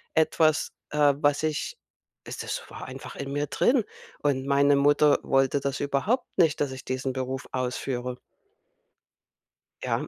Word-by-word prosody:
etwas, 155 Hz, -1 st, +3 dB, 0.2 s
äh, 145 Hz, -1 st, +4 dB
was 145 Hz, +1 st, +2 dB
ich 155 Hz, -1 st, -2 dB, 0.5 s
es -, -, -7 dB
das -, -, -4 dB
war -, -, -8 dB
einfach -, -, -9 dB
in 140 Hz, 0 st, -5 dB
mir 145 Hz, +1 st, -1 dB
drin 230 Hz, -, +2 dB, 0.4 s
und 135 Hz, -2 st, 0 dB
meine 140 Hz, 0 st, +4 dB
Mutter 145 Hz, +1 st, +4 dB
wollte 135 Hz, +1 st, +2 dB
das 140 Hz, 0 st, -2 dB
überhaupt 145 Hz, -, 0 dB
nicht, 160 Hz, -3 st, +3 dB
dass 145 Hz, -2 st, 0 dB
ich 130 Hz, -2 st, -8 dB
diesen 130 Hz, 0 st, -3 dB
Beruf 130 Hz, 0 st, -4 dB
ausführe. 125 Hz, 0 st, -3 dB, 1.6 s
Ja. -, -, -1 dB
140 Hz, 145 wpm, -26 LUFS, 130-150 Hz, 1.6 s, äh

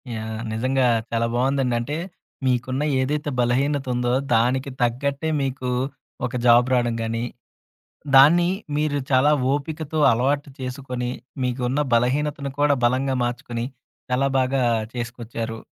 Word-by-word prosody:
Yeah! 110 Hz, 0 st, -5 dB
నిజంగా 130 Hz, +3 st, +1 dB, 0.3 s
చాలా 115 Hz, 0 st, +1 dB
బావునదండి. 130 Hz, 0 st, +1 dB
అంటే 145 Hz, +6 st, -3 dB, 0.5 s
మీకున్న 130 Hz, +3 st, 0 dB, 0.2 s
ఏదైతే 150 Hz, +3 st, -1 dB
బలహీనతుందో 125 Hz, 0 st, +1 dB, 0.2 s
దానికి 130 Hz, +4 st, +1 dB
తగ్గట్టే 140 Hz, +5 st, 0 dB
మీకు 130 Hz, -2 st, -2 dB, 0.6 s
ఒక -, -, -5 dB
జాబ్ 120 Hz, +1 st, +6 dB
రావడం 120 Hz, -2 st, +2 dB
గానీ, 115 Hz, +1 st, -2 dB, 0.9 s
దాన్ని 170 Hz, +6 st, +7 dB, 0.3 s
మీరు 150 Hz, -1 st, 0 dB
చాలా 130 Hz, +3 st, +5 dB, 0.2 s
ఓపికతో 155 Hz, +2 st, -3 dB
అలవాటు 140 Hz, +5 st, 0 dB
చేసుకొని 125 Hz, -1 st, -4 dB, 0.3 s
మీకున్న 125 Hz, +2 st, -1 dB, 0.2 s
బలహీనతను 140 Hz, +3 st, 0 dB
కూడా 145 Hz, -1 st, +4 dB
బలంగా 130 Hz, +2 st, +1 dB
మార్చుకొని 120 Hz, -1 st, -3 dB, 0.5 s
చాలా 135 Hz, +2 st, +2 dB
బాగా 130 Hz, +1 st, +1 dB, 0.3 s
చేసుకొచ్చారు. 115 Hz, -1 st, -5 dB
130 Hz, 110 wpm, -23 LUFS, 120-140 Hz, 0.9 s, దాన్ని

